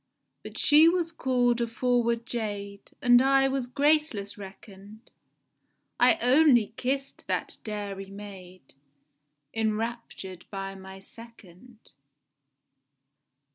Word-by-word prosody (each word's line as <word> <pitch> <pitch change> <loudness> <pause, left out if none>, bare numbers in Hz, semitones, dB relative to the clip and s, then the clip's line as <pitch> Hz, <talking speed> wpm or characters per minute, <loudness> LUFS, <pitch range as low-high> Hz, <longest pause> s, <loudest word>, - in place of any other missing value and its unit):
But - - -10
she 305 +3 +6
was 340 -1 -1
call'd 245 -5 +1
a 235 - 0
forward 235 0 0
jade, 205 -4 -5
And 245 -1 +6
I 270 0 +4
was 270 -2 -2
graceless 280 -7 +1
reckon'd;— 200 +2 -13 0.9
I 335 - +5
only 250 -4 +4
kiss'd 270 +2 -3
that - - -2
dairy 200 -2 -6
maid, 190 -5 -12 0.8
Enraptur'd 220 -4 -4
by 195 -1 -5
my 190 0 -11
second. 225 +1 -16
230 Hz, 95 wpm, -27 LUFS, 200-255 Hz, 0.9 s, she